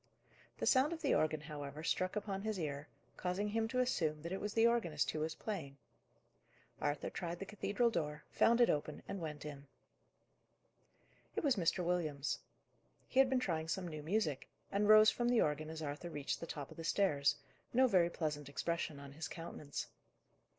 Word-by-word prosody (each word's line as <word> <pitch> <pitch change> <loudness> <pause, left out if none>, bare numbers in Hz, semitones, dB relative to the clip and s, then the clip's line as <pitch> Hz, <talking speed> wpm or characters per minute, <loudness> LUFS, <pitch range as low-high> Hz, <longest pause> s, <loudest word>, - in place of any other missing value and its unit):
The - - -2
sound 275 +5 +4
of 325 -1 -7
the 285 - +3
organ, 155 -1 +2
however, 150 -1 -6
struck 185 +4 0
upon 200 -2 -2
his 215 0 -2
ear, 145 -2 -3 0.3
causing 185 +3 -1
him 225 +1 0
to 255 +3 -1
assume 155 -11 0
that 170 - -4
it 190 - -2
was 210 0 -3
the 225 0 +5
organist 210 -11 +2
who 155 - -3
was 160 +1 -2
playing. 160 -11 -5 1.0
Arthur 145 0 -1
tried 175 -1 -4
the 195 - -5
cathedral 210 +3 +1
door, 150 -6 -2
found 235 +1 +4
it 240 - +6
open, 150 0 -3
and 195 - -4
went 150 -2 -5
it. 145 -2 -6 1.8
It - - -1
was 280 -4 +4
Mr. 180 -1 +1
Williams. 155 -5 0 0.7
He 260 - +1
had 270 -1 +7
been 260 -1 +3
trying 165 -9 -1
some 180 +3 -2
new 155 -2 -5
music, 160 -4 -1 0.2
and 205 +1 +2
rose 215 0 +9
from 240 0 0
the 245 -2 +4
organ 155 +1 0
as 160 0 -5
Arthur 150 +4 -4
reached 145 -4 -3
the 165 - -6
top 145 -4 -6
of - - -12
the 165 - -6
stairs, 160 -6 +3 0.4
no 260 +2 +5
very 185 -8 +4
pleasant 150 -4 -3
expression 160 0 -2
on 140 -1 -9
his 160 +3 -5
countenance. 155 -3 -5
170 Hz, 185 wpm, -36 LUFS, 150-210 Hz, 1.8 s, rose